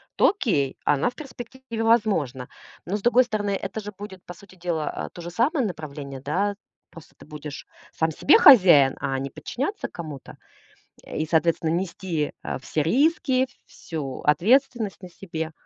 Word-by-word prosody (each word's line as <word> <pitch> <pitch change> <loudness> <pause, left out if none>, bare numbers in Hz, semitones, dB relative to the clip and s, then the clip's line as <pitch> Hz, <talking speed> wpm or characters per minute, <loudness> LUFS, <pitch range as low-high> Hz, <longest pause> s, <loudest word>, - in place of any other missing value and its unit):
то - - +5
окей, 180 - -1
она 145 - +2
в - - -15
перспективе 255 -4 -7
возможна. 195 - +1 0.4
Но 195 +4 -1
с - - -9
другой 240 +3 +5
стороны, 210 -3 -2
это - - -4
же 210 0 -7
будет 195 -3 -9
по 175 - -8
сути 190 +2 -17
дела, 170 -4 -3
э, - - -11
то 175 - -9
же 170 +1 -7
самое 255 - +1
направление, 145 -7 -6
да? 195 +9 -1 0.4
Просто 165 - -15
ты - - -15
будешь 150 -1 -8 0.3
сам 160 0 0
себе 285 - +5
хозяин, 180 - +7
а 135 -1 -2
не 135 +1 -4
подчиняться 290 - -4
кому-то. 155 -6 -9 0.7
Э, - - -8
и 155 - -1
соответственно 165 0 +1
нести, 170 -2 -2
э, - - -3
все 150 +3 -1
риски, 265 - +2 0.2
всю 140 -5 -6
ответственность 220 - +2
на 180 - -8
себе. 165 -3 -6
180 Hz, 165 wpm, -24 LUFS, 155-230 Hz, 0.7 s, хозяин